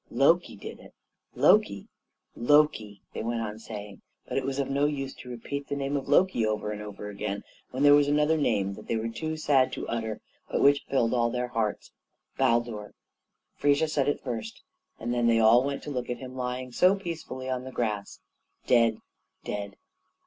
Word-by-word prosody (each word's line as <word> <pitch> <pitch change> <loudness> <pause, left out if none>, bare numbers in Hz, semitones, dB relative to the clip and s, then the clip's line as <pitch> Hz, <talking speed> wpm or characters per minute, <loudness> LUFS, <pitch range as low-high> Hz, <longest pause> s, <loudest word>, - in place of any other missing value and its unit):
"Loki - - +3
did - - -9
it! - - -16 0.4
Loki, 205 - +3 0.5
Loki!" 120 -7 +2
they - - -4
went 115 +1 -2
on 105 -1 -5
saying; 105 -3 -8 0.3
but - - -5
it 135 - +1
was 135 0 -2
of 140 - 0
no 140 +1 +1
use 135 -2 -2
to 125 - -12
repeat 140 +4 -5
the 140 - -2
name 140 0 -2
of 140 -1 -3
Loki 165 -4 +4
over 105 -1 -1
and 105 0 -5
over 105 0 -7
again 100 0 -4 0.3
when 130 +3 -2
there 145 0 +8
was 145 0 +5
another 150 +2 +3
name 100 -10 +1
they 115 - -4
were 110 +1 -2
too 160 +6 -4
sad 140 -4 +3
to - - -5
utter 110 -2 -3 0.3
but - - 0
which 140 0 +4
filled 125 -4 +2
all 120 -1 +2
their 125 +1 -2
hearts 115 -3 -2 0.4
Baldur. 120 -4 0 0.6
Frigga 145 +2 +2
said 150 -3 0
it 145 - -2
first, 115 -3 -5 0.4
and 120 +2 -2
then 120 -1 +2
they 115 -1 +4
all 115 +3 +6
went 140 0 -3
to 150 - -6
look 125 -3 -3
at 125 - -2
him 130 0 -9
lying 125 0 -3
down - - -17
so 185 +8 +5
peacefully 165 -9 -6
on 130 -1 -2
the 130 - -8
grass 105 -5 -3 0.4
dead, 115 -3 +4 0.5
dead. 100 -1 -5
125 Hz, 190 wpm, -28 LUFS, 110-140 Hz, 0.6 s, there